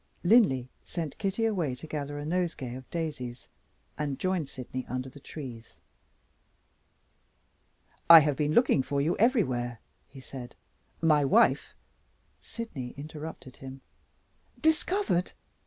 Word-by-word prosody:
Linley 175 - +4 0.2
sent 160 -5 -5
Kitty 200 +3 0
away 175 - 0
to 125 - -10
gather 145 -2 -4
a 145 - -5
nosegay 165 -7 -2
of 130 0 -9
daisies, 135 -7 -5 0.5
and 145 -3 -2
joined 185 -6 -1
Sydney 130 0 -6
under 130 +1 -4
the 145 - -14
trees. 125 -6 -9 2.3
"I 165 -1 +12
have 145 -1 +1
been 150 +1 0
looking 235 - +4
for 140 +1 -2
you 150 +5 +1
everywhere," 130 - +1 0.3
he 135 0 -13
said. 130 -2 -9 0.5
"My 155 -3 +4
wife 215 - +3 0.3
" - - -40
Sydney 145 - -6
interrupted 150 -3 -8
him. 135 0 -9 0.8
"Discovered!" 320 - +1
150 Hz, 125 wpm, -29 LUFS, 130-175 Hz, 2.3 s, I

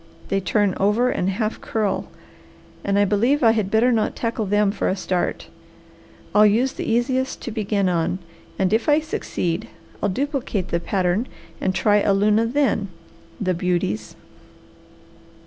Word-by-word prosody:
They 195 - +1
turn 200 0 +1
over 220 +6 +2
and 180 - 0
half 215 +3 -2
curl 215 -3 -1 0.8
and 200 0 +1
I 205 - +4
believe 235 +8 +2
I 225 - +7
had 215 -4 0
better 225 +4 +3
not 225 -3 0
tackle 230 -3 -2
them 205 0 +2
for - - -1
a 185 - 0
start. 185 -2 -2 0.9
I'll 210 - +6
use 230 +6 +3
the - - -3
easiest 260 +3 0
to 235 - -4
begin 210 -3 0
on, 175 0 0 0.4
and 190 +1 +1
if 225 +6 +1
I 295 +1 +5
succeed 180 - -3 0.3
I'll 205 - +1
duplicate 255 - -2
the 170 - 0
pattern 185 +5 0 0.3
and 190 0 0
try 210 -1 +3
a 200 -1 +2
luna 210 +3 +3
then. 240 -5 +1 0.5
The 185 -4 0
beauties!" 170 - -2
210 Hz, 155 wpm, -22 LUFS, 190-230 Hz, 0.9 s, I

